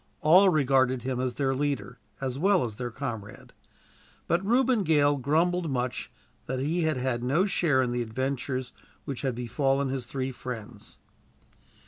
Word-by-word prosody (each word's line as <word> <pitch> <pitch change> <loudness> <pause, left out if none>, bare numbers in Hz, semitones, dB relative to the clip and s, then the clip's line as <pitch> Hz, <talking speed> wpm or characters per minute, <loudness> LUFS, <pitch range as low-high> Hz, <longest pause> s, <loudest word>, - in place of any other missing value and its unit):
All 180 +5 +7
regarded 130 -5 +2
him 130 -1 -2
as 125 -1 -2
their 135 -2 0
leader, 130 -4 -2 0.2
as 130 0 -3
well 190 -4 +3
as 110 -3 -7
their 125 -1 -3
comrade. 115 -5 -7 0.7
But 170 +3 +1
Reuben 245 +2 +3
Gale 145 -4 +3
grumbled 165 +5 +1
much 125 -2 -3 0.4
that 130 - -2
he 160 +6 0
had 155 -4 +1
had 125 -2 -1
no 145 +10 +2
share 155 -9 +2
in 125 - -1
the 120 0 -1
adventures 130 +2 -3 0.3
which 140 -4 -4
had 130 -4 -1
befallen 135 +3 0
his 130 -2 -4
three 130 0 -3
friends. 120 -4 -8
135 Hz, 155 wpm, -27 LUFS, 125-155 Hz, 0.7 s, All